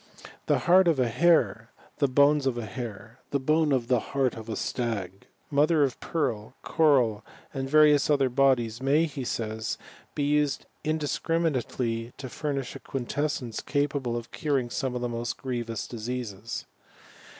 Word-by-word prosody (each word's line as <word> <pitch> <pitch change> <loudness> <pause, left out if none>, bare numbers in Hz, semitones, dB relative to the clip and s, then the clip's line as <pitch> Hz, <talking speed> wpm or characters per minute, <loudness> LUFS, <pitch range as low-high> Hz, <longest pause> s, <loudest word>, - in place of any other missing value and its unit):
The - - +4
heart 185 +1 +6
of 160 -5 +3
a 125 - +3
hare, 115 - +3 0.3
the 140 - +4
bones 140 +1 +4
of 125 -2 0
a 120 - -3
hare, 115 +2 -7
the 140 - 0
bone 155 +3 +2
of 125 -4 +1
the 125 -1 +3
heart 135 +1 0
of 110 0 -9
a 110 - -2
stag, 100 -6 -3 0.2
mo 145 +1 +4
ther 160 -3 +3
of 135 -4 -1
pearl, 120 -7 -2
coral, 125 -9 +3 0.3
and 135 -1 -3
various 150 -1 +5
other 140 -3 +4
bodies 125 -3 +2
may, 145 +5 +3
he 140 -4 -5
says, 110 -2 -3 0.4
be 145 - 0
used 145 -1 +1 0.2
indiscriminately 145 -6 -1
to 130 - -7
furnish 140 -2 -3
a - - -7
quintessence 135 -2 -3
capable 140 -4 -1
of 115 - -7
curing 135 -5 -1
some 130 -4 -2
of 125 - -2
the 120 - 0
most 120 0 -3
grievous 120 -4 -3
diseases. 115 -2 -5
130 Hz, 160 wpm, -27 LUFS, 115-145 Hz, 0.4 s, heart